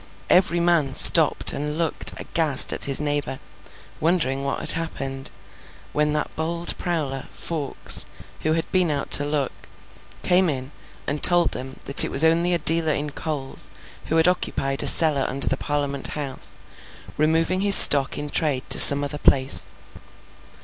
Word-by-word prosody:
Every 180 Hz, -2 st, +1 dB
man 170 Hz, -6 st, -2 dB
stopped -, -, +5 dB
and 150 Hz, +1 st, -7 dB
looked 165 Hz, -2 st, -3 dB
aghast 155 Hz, -5 st, -1 dB
at -, -, +1 dB
his 135 Hz, -1 st, +2 dB
neighbour, 145 Hz, -2 st, -5 dB, 0.6 s
wondering 150 Hz, -5 st, -2 dB
what 140 Hz, -, -5 dB
had -, -, +2 dB
happened, 135 Hz, -5 st, -7 dB, 0.6 s
when 150 Hz, 0 st, -2 dB
that 150 Hz, -, -6 dB
bold 170 Hz, +2 st, -2 dB
prowler, 150 Hz, -7 st, -6 dB
Fawkes, 155 Hz, -5 st, -2 dB, 0.3 s
who 155 Hz, -, -3 dB
had 165 Hz, 0 st, -3 dB
been 180 Hz, -3 st, 0 dB
out 145 Hz, -2 st, -6 dB
to 145 Hz, -, +4 dB
look, 145 Hz, -3 st, -4 dB, 0.7 s
came 180 Hz, 0 st, 0 dB
in 130 Hz, -1 st, -6 dB, 0.3 s
and 145 Hz, +1 st, -6 dB
told 175 Hz, -1 st, +2 dB
them 130 Hz, +1 st, -10 dB
that 140 Hz, -, +7 dB
it -, -, -4 dB
was 140 Hz, -, +2 dB
only 165 Hz, +2 st, 0 dB
a -, -, -1 dB
dealer 160 Hz, 0 st, +2 dB
in 145 Hz, +1 st, -6 dB
coals 140 Hz, -3 st, -7 dB, 0.4 s
who 160 Hz, -, -3 dB
had 160 Hz, +1 st, +1 dB
occupied 135 Hz, -6 st, -3 dB
a -, -, -4 dB
cellar 150 Hz, -4 st, +3 dB
under 140 Hz, +1 st, -4 dB
the 135 Hz, -, -1 dB
Parliament 140 Hz, -1 st, -5 dB
House, 140 Hz, -3 st, -7 dB, 0.6 s
removing 165 Hz, +4 st, -2 dB
his 200 Hz, -1 st, +6 dB
stock 140 Hz, -2 st, +7 dB
in 150 Hz, -, -7 dB
trade 140 Hz, -5 st, -3 dB
to -, -, +6 dB
some 140 Hz, 0 st, +9 dB
other 145 Hz, +1 st, -7 dB
place. 130 Hz, -2 st, +2 dB
150 Hz, 160 wpm, -20 LUFS, 140-165 Hz, 0.7 s, some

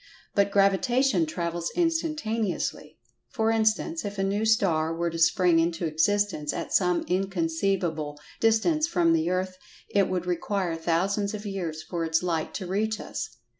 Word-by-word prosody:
But 200 Hz, 0 st, +3 dB
Gravitation 200 Hz, -, +2 dB
travels 170 Hz, +1 st, -3 dB
instantaneously. 305 Hz, -, -1 dB, 0.3 s
For 225 Hz, -2 st, 0 dB
instance, 225 Hz, +9 st, +1 dB
if 205 Hz, -1 st, -5 dB
a 195 Hz, -, 0 dB
new 200 Hz, +3 st, 0 dB
star 170 Hz, -8 st, +2 dB
were 170 Hz, 0 st, -1 dB
to 165 Hz, -, -5 dB
spring 165 Hz, +1 st, +4 dB
into 170 Hz, +1 st, 0 dB
existence 160 Hz, -1 st, +1 dB
at -, -, -5 dB
some 180 Hz, -2 st, +2 dB
inconceivable 170 Hz, -4 st, -1 dB, 0.2 s
distance 305 Hz, +9 st, +2 dB
from 170 Hz, -, +2 dB
the 165 Hz, +1 st, +1 dB
earth 185 Hz, 0 st, -2 dB, 0.3 s
it 200 Hz, -2 st, +2 dB
would 180 Hz, -1 st, -2 dB
require 180 Hz, 0 st, -1 dB
thousands 195 Hz, +6 st, 0 dB
of 210 Hz, 0 st, -8 dB
years 170 Hz, -6 st, -4 dB
for 170 Hz, -2 st, -3 dB
its 160 Hz, +1 st, +1 dB
light 165 Hz, -3 st, -1 dB
to 190 Hz, -, -4 dB
reach 215 Hz, +4 st, -1 dB
us. -, -, -5 dB
185 Hz, 150 wpm, -26 LUFS, 165-210 Hz, 0.3 s, spring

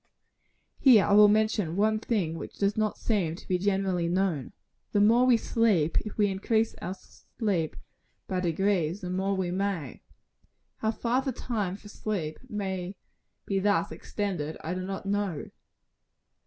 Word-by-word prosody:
Here 240 Hz, -7 st, +7 dB
I 200 Hz, -, +2 dB
will 210 Hz, 0 st, +9 dB
mention 210 Hz, -5 st, +1 dB
one 215 Hz, +2 st, +2 dB
thing 200 Hz, -8 st, -1 dB
which -, -, -8 dB
does 200 Hz, 0 st, +1 dB
not 215 Hz, -1 st, 0 dB
seem 185 Hz, -8 st, 0 dB
to -, -, -13 dB
be 180 Hz, -1 st, +1 dB
generally 190 Hz, -3 st, 0 dB
known. 175 Hz, -6 st, 0 dB, 0.4 s
The 205 Hz, -, +3 dB
more 230 Hz, +5 st, +5 dB
we 245 Hz, -2 st, +6 dB
sleep, 210 Hz, -9 st, +2 dB
if 215 Hz, -, -8 dB
we 210 Hz, -, +4 dB
increase 220 Hz, +3 st, +1 dB
our 185 Hz, -, -4 dB
sleep 185 Hz, -3 st, -3 dB, 0.5 s
by 185 Hz, -2 st, -1 dB
degrees, 180 Hz, 0 st, 0 dB
the 180 Hz, -1 st, -4 dB
more 190 Hz, +2 st, 0 dB
we 185 Hz, -2 st, -1 dB
may. 185 Hz, -7 st, -2 dB, 0.8 s
How 220 Hz, -, -1 dB
far 235 Hz, +3 st, 0 dB
the 265 Hz, 0 st, -2 dB
time 215 Hz, -6 st, -3 dB
for 205 Hz, +1 st, -13 dB
sleep 195 Hz, -7 st, -4 dB
may 190 Hz, -3 st, -3 dB, 0.5 s
be 195 Hz, -1 st, 0 dB
thus 195 Hz, -5 st, +1 dB
extended, 170 Hz, -2 st, -4 dB
I 165 Hz, -, -2 dB
do 185 Hz, -, -3 dB
not 195 Hz, +1 st, -5 dB
know. 200 Hz, -6 st, -2 dB
195 Hz, 155 wpm, -28 LUFS, 180-215 Hz, 0.8 s, will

